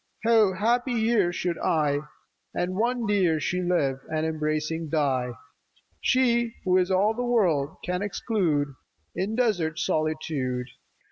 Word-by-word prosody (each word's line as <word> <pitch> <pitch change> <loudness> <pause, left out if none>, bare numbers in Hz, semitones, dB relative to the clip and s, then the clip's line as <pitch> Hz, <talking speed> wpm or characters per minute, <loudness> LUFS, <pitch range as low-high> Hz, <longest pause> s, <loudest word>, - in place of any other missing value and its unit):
How 220 -4 +5
happy 240 +6 +1
here 220 -5 +2
should 175 0 -2
I 150 -3 +1 0.6
And 180 +1 -1
one 240 +3 0
dear 185 -6 +2
She 180 +4 -1
live, 160 -7 +1
and 155 0 0
embracing 155 0 -2
die! 130 -5 0 0.7
She 235 -3 +2
who 185 0 +4
is 180 0 +1
all 195 +3 +3
the 240 - -4
world, 185 - +2
and - - -22
can 180 +1 -2
exclude 180 - 0 0.4
In 200 +4 -2
deserts 180 -10 0
solitude. 150 -5 -1
180 Hz, 135 wpm, -26 LUFS, 155-220 Hz, 0.7 s, How